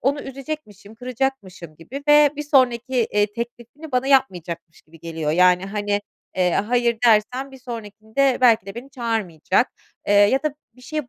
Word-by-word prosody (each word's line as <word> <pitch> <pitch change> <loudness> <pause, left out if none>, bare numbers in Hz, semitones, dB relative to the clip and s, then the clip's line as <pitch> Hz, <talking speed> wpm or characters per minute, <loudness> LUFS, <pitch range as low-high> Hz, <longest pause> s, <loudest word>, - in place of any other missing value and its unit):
onu 280 +3 0
üzecekmişim, 270 -7 -8
kıracakmışım 225 - -4
gibi 265 +12 -9
ve 295 -1 +7
bir 295 - -3
sonraki, 260 -3 +2 0.2
eee, 205 0 +3
teklifini 240 +6 -8
bana 250 +1 +1
yapmayacakmış 175 - 0
gibi 165 +1 -19
geliyor. 160 -2 -3
Yani, 180 +2 +4
hani, 205 0 -1 0.4
eee, 180 -1 +2
"hayır" 235 +1 +1
dersem 245 +5 +2
bir 265 - -13
sonrakinde 230 +2 -2
belki 230 -5 +4
de 195 - -8
beni 255 +4 -9
çağırmayacak. 220 - -1 0.4
Eee, - - +3
ya 205 +7 +4
da 305 -2 -2 0.2
bir 250 - -19
şeyi 305 -3 -5
235 Hz, 155 wpm, -22 LUFS, 200-265 Hz, 0.4 s, ve